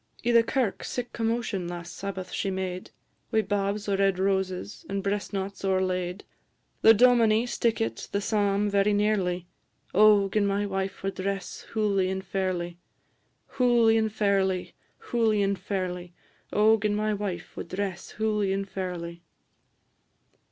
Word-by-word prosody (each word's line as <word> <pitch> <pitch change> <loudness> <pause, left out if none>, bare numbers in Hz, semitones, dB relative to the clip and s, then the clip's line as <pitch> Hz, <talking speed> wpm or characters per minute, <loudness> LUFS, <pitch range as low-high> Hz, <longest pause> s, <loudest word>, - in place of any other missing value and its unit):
I' 240 - +3
the 235 -1 +7
kirk 235 -3 -1
sic 245 -1 -4
commotion 225 -5 -1
last 175 0 -7
Sabbath 190 -2 -5
she 195 - -1
made, 185 -1 -4 0.4
Wi' 220 - +3
babs 205 0 -1
o' 200 - +1
red 195 -1 +2
roses, 190 0 -1
and 195 0 -2
breast 200 0 -2
knots 195 0 -4
o'erlaid; 185 -1 0 0.6
The 225 0 +8
dominie 230 -1 +5
stickit 165 - -1
the 200 - -1
psalm 205 -1 +1
very 200 0 +2
nearly. 195 -4 +1 0.5
O 205 0 +6
gin 200 +1 +1
my 200 +1 0
wife 195 -1 -3
wad 195 0 -1
dress 195 -1 -4
hooly 200 -4 +1
and 190 0 -3
fairly! 180 -2 -2 0.8
Hooly 240 -3 +5
and 220 -1 +1
fairly, 195 -3 0 0.2
hooly 225 - +1
and 195 -1 0
fairly; 180 -2 -4 0.4
O 220 +1 +4
gin 205 0 0
my 215 0 0
wife 195 -5 -4
wad - - -6
dress 185 0 -4
hooly 210 -2 +1
and 195 0 -1
fairly! 175 -3 -5
200 Hz, 145 wpm, -27 LUFS, 185-215 Hz, 0.8 s, The